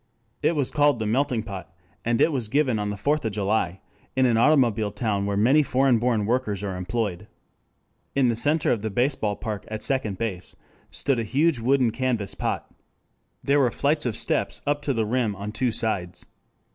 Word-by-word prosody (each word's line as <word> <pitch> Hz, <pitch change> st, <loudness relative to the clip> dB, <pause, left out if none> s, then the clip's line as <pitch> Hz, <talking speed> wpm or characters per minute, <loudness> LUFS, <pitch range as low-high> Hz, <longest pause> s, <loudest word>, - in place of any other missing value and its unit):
It 165 Hz, -, +2 dB
was 140 Hz, -4 st, 0 dB
called 145 Hz, -3 st, +3 dB
the 110 Hz, -, -3 dB
Melting 120 Hz, 0 st, 0 dB
Pot, 95 Hz, -4 st, -8 dB, 0.3 s
and 120 Hz, 0 st, +1 dB
it 165 Hz, -, +4 dB
was 125 Hz, -6 st, -2 dB
given 130 Hz, -2 st, +1 dB
on 105 Hz, 0 st, -2 dB
the 105 Hz, -, -4 dB
Fourth 145 Hz, +9 st, 0 dB
of 110 Hz, -3 st, -2 dB
July 100 Hz, -3 st, -1 dB, 0.3 s
in 130 Hz, 0 st, +3 dB
an 120 Hz, -2 st, +3 dB
automobile 115 Hz, -5 st, +3 dB
town 100 Hz, -1 st, -1 dB
where 100 Hz, 0 st, -1 dB
many 130 Hz, +9 st, +5 dB
foreign 130 Hz, -3 st, +2 dB
born 115 Hz, -3 st, +1 dB
workers 110 Hz, -4 st, -1 dB
are 95 Hz, -2 st, -3 dB
employed. 95 Hz, 0 st, -3 dB, 0.9 s
In 135 Hz, -2 st, +3 dB
the 120 Hz, -, +1 dB
center 150 Hz, +6 st, +2 dB
of 115 Hz, -, 0 dB
the 110 Hz, -, -2 dB
baseball 115 Hz, -1 st, 0 dB
park 105 Hz, -2 st, -5 dB
at 110 Hz, 0 st, -5 dB
second 130 Hz, -8 st, -1 dB
base 95 Hz, -5 st, -4 dB, 0.3 s
stood 135 Hz, -4 st, 0 dB
a -, -, -1 dB
huge 140 Hz, +5 st, +1 dB
wooden 130 Hz, +1 st, +3 dB
and -, -, -6 dB
canvas 125 Hz, -6 st, -1 dB
pot. -, -, -3 dB, 0.8 s
There 140 Hz, +1 st, +3 dB
were 130 Hz, -3 st, +4 dB
flights 145 Hz, +3 st, 0 dB
of 115 Hz, -, -2 dB
steps -, -, 0 dB
up 145 Hz, 0 st, 0 dB
to 145 Hz, -1 st, -1 dB
the 110 Hz, -1 st, +1 dB
rim 115 Hz, -2 st, 0 dB
on 100 Hz, +2 st, -5 dB
two 125 Hz, +2 st, 0 dB
sides. 100 Hz, -6 st, -3 dB
115 Hz, 195 wpm, -25 LUFS, 105-135 Hz, 0.9 s, many